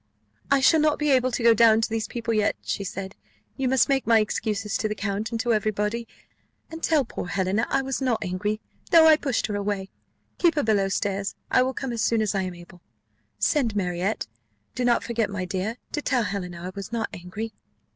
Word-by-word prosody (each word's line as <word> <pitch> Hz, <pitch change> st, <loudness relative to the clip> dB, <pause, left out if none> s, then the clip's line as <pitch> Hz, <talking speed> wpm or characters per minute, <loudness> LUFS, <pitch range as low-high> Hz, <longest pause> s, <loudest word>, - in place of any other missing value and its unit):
"I 275 Hz, -1 st, +4 dB
shall 320 Hz, +4 st, +5 dB
not 305 Hz, -1 st, +3 dB
be 300 Hz, -1 st, +1 dB
able 255 Hz, -1 st, +3 dB
to 240 Hz, -, -2 dB
go 230 Hz, 0 st, +7 dB
down 225 Hz, 0 st, +5 dB
to -, -, +1 dB
these 225 Hz, -1 st, -2 dB
people 230 Hz, -1 st, -3 dB
yet," 215 Hz, -1 st, +2 dB
said 195 Hz, -1 st, -4 dB
she; 105 Hz, +1 st, -39 dB, 0.3 s
"you 260 Hz, -, +2 dB
must 265 Hz, -1 st, +4 dB
make 270 Hz, -3 st, 0 dB
my 230 Hz, -1 st, +6 dB
excuses 210 Hz, -1 st, -2 dB
to 215 Hz, -, -1 dB
the 210 Hz, -, -3 dB
count 205 Hz, +1 st, -2 dB
and 230 Hz, -, -3 dB
to 240 Hz, -1 st, +1 dB
every 215 Hz, 0 st, +1 dB
body; 215 Hz, +3 st, -2 dB, 0.6 s
and 325 Hz, 0 st, -7 dB
tell 310 Hz, -5 st, +2 dB
poor 200 Hz, -, -6 dB
Helena 195 Hz, +3 st, 0 dB
I 270 Hz, 0 st, +1 dB
was 270 Hz, 0 st, -3 dB
not 250 Hz, -5 st, 0 dB
angry, 205 Hz, +3 st, -2 dB, 0.3 s
though 330 Hz, -2 st, +7 dB
I 315 Hz, -1 st, +8 dB
pushed 275 Hz, -5 st, -1 dB
her 210 Hz, -, -3 dB
away. 200 Hz, -1 st, -3 dB, 0.5 s
Keep 345 Hz, -2 st, +4 dB
her 290 Hz, -, +1 dB
below 205 Hz, -3 st, +2 dB
stairs: 200 Hz, 0 st, -2 dB, 0.2 s
I -, -, +5 dB
will 260 Hz, 0 st, 0 dB
come 265 Hz, -3 st, -3 dB
as 230 Hz, -, -2 dB
soon 220 Hz, 0 st, +2 dB
as 215 Hz, -, -1 dB
I 195 Hz, -, 0 dB
am 185 Hz, -1 st, -4 dB
able. 175 Hz, +1 st, -14 dB, 0.6 s
Send 250 Hz, -9 st, +1 dB
Marriott. 185 Hz, +1 st, -1 dB, 0.5 s
Do 250 Hz, -, -2 dB
not 240 Hz, -1 st, +3 dB
forget, 230 Hz, -3 st, -1 dB
my 200 Hz, -2 st, -3 dB
dear, 190 Hz, +6 st, -3 dB
to 295 Hz, -, -2 dB
tell 255 Hz, -4 st, +1 dB
Helena 180 Hz, -4 st, -4 dB
I 180 Hz, -, -5 dB
was 200 Hz, +2 st, -7 dB
not 230 Hz, -1 st, -1 dB
angry." 205 Hz, +6 st, -6 dB
220 Hz, 220 wpm, -25 LUFS, 200-250 Hz, 0.6 s, I